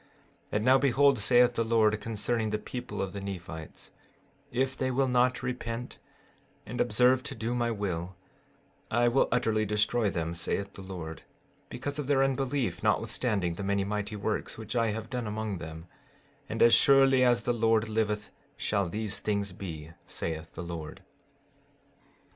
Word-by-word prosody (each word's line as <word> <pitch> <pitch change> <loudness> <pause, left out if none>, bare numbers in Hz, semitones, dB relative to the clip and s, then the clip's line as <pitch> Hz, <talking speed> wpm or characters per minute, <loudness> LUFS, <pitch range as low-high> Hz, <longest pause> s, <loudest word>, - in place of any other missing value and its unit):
15:17 - - -31 0.5
And 105 +1 0
now 130 +1 +7
behold, 140 0 +4
saith 120 +3 +5
the 115 - +1
Lord, 110 -2 +2
concerning 110 +1 -1
the 105 - 0
people 125 +2 -5
of 95 - -5
the 100 - -5
Nephites: 85 -5 -7 0.6
If 130 +2 0
they 130 -1 -1
will 135 +1 +1
not 125 0 +2
repent, 125 -1 -4 0.7
and - - -3
observe 125 +4 +4
to 140 0 -4
do 115 +1 -2
my 120 -1 0
will, 95 -5 -3 0.7
I 120 +2 +3
will 120 +3 +3
utterly 110 -3 +2
destroy 105 +2 +1
them, 85 -2 -2
saith 100 +3 -2
the - - -9
Lord, 85 -4 -7 0.5
because 145 +3 -4
of 145 - -3
their 135 -2 +4
unbelief 135 -7 -1
notwithstanding 105 -4 0
the 95 +4 -6
many 100 0 +1
mighty 105 +1 -3
works 105 +1 -2
which 110 +1 -6
I 115 -1 +3
have 110 +2 -4
done 125 -3 -2
among 105 -3 -3
them; 80 0 -8 0.6
and - - +2
as 120 - +7
surely 135 -1 +6
as 120 -2 +3
the 120 - +1
Lord 115 -1 +2
liveth 105 -1 -1 0.3
shall 100 -4 0
these 105 +2 -3
things 100 -2 -1
be, 80 -4 -7 0.2
saith 80 -2 -5
the - - -5
Lord. 85 -3 -7
110 Hz, 165 wpm, -29 LUFS, 100-125 Hz, 0.7 s, now